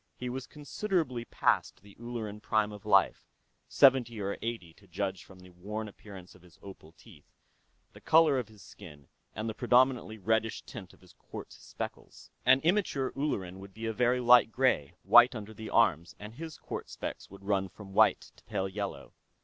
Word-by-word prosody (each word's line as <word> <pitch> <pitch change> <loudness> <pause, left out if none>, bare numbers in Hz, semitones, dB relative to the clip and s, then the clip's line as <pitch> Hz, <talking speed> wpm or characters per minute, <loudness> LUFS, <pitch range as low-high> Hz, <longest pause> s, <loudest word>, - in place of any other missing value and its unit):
He 125 0 -4
was 130 +1 -6
considerably 150 - -2
past - - 0
the 100 -1 -16
Ulleran 115 -3 -6
prime 105 0 +1
of 105 -1 -11
life - - +3 0.4
seventy 125 -4 +4
or 100 0 -2
eighty, 115 -8 -5
to 100 +2 -22
judge 95 +1 -4
from 95 - -16
the 90 0 -15
worn 105 +5 -6
appearance 100 -3 -12
of 90 - -19
his 90 -1 -20
opal 90 -5 -12
teeth, 80 -3 -18 0.6
the - - -15
color 155 -4 +4
of 120 - -5
his 105 -2 -17
skin, 75 -5 -14 0.3
and 110 +3 -4
the 110 - -3
predominantly 125 -1 +2
reddish 110 +2 -1
tint 90 -3 -10
of - - -28
his 90 -3 -19
quartz - - -11
speckles. - - -9 0.2
An 130 +1 +6
immature 165 -7 +1
Ulleran 95 -11 -3
would 95 0 -12
be 115 +1 -6
a 110 - -2
very 125 +2 +2
light 120 -1 +6
gray, 125 - +1
white 120 +1 +7
under 110 -1 -7
the 110 0 -8
arms, 85 -8 +2
and 105 +1 -10
his 160 +4 -8
quartz - - -7
specks - - -6
would 100 0 -14
run 100 -1 0
from 95 -1 -13
white - - +3
to - - -21
pale 95 - -2
yellow. 100 +1 -6
110 Hz, 185 wpm, -30 LUFS, 95-125 Hz, 0.6 s, white